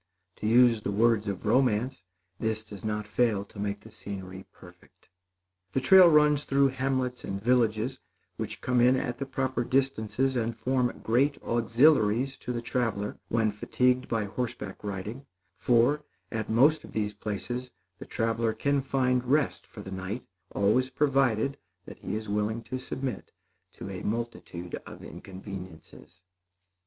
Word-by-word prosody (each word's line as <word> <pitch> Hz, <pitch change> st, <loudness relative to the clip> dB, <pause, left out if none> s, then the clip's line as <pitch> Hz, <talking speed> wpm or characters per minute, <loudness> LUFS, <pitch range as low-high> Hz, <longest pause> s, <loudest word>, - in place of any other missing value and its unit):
To 105 Hz, -, -3 dB
use 120 Hz, -1 st, +5 dB
the 100 Hz, -, -3 dB
words 110 Hz, 0 st, +3 dB
of 100 Hz, +1 st, -4 dB
romance, 125 Hz, -1 st, +1 dB, 0.3 s
this 110 Hz, -1 st, -1 dB
does 105 Hz, -3 st, -11 dB
not 105 Hz, -1 st, -2 dB
fail 105 Hz, -3 st, +1 dB
to 100 Hz, -, -13 dB
make 100 Hz, 0 st, -3 dB
the 110 Hz, -, -14 dB
scenery 95 Hz, -3 st, -8 dB
perfect. -, -, -18 dB, 0.6 s
The -, -, +2 dB
trail 180 Hz, +6 st, +8 dB
runs 150 Hz, -2 st, +4 dB
through 140 Hz, -1 st, +3 dB
hamlets 130 Hz, -1 st, -1 dB
and 100 Hz, 0 st, -4 dB
villages, 120 Hz, +2 st, +1 dB, 0.4 s
which -, -, -5 dB
come 125 Hz, -1 st, +2 dB
in 125 Hz, +2 st, +5 dB
at 125 Hz, -2 st, -2 dB
the 140 Hz, -, -3 dB
proper 130 Hz, -2 st, -1 dB
distances 130 Hz, 0 st, 0 dB
and 115 Hz, -1 st, -1 dB
form 125 Hz, 0 st, 0 dB
great 135 Hz, +5 st, +2 dB
auxiliaries 120 Hz, +1 st, +3 dB
to 125 Hz, -, -5 dB
the 120 Hz, -1 st, -3 dB
traveler, 115 Hz, -4 st, -2 dB
when 110 Hz, -2 st, +1 dB
fatigued 125 Hz, +4 st, +1 dB
by 115 Hz, -2 st, 0 dB
horseback 110 Hz, -2 st, -5 dB
riding; 105 Hz, +7 st, -5 dB, 0.3 s
for, 125 Hz, +8 st, +3 dB, 0.3 s
at 110 Hz, -2 st, -3 dB
most 140 Hz, +8 st, +4 dB
of -, -, -12 dB
these 105 Hz, -1 st, -1 dB
places, 110 Hz, +5 st, -4 dB, 0.3 s
the -, -, -8 dB
traveler 115 Hz, 0 st, 0 dB
can 140 Hz, +5 st, +1 dB
find 130 Hz, -2 st, +1 dB
rest 145 Hz, +4 st, +1 dB
for 105 Hz, -, -10 dB
the 95 Hz, -, -8 dB
night, 95 Hz, +5 st, -5 dB, 0.2 s
always 115 Hz, +6 st, +2 dB
provided 135 Hz, -2 st, +1 dB, 0.3 s
that -, -, -11 dB
he -, -, -3 dB
be 110 Hz, 0 st, -6 dB
willing 105 Hz, +3 st, -1 dB
to 130 Hz, +2 st, -5 dB
submit 130 Hz, -4 st, -5 dB, 0.4 s
to 95 Hz, -, -8 dB
a 95 Hz, -, -6 dB
multitude 105 Hz, -6 st, -4 dB
of -, -, -10 dB
inconveniences. 95 Hz, -4 st, -10 dB
115 Hz, 150 wpm, -28 LUFS, 105-130 Hz, 0.6 s, trail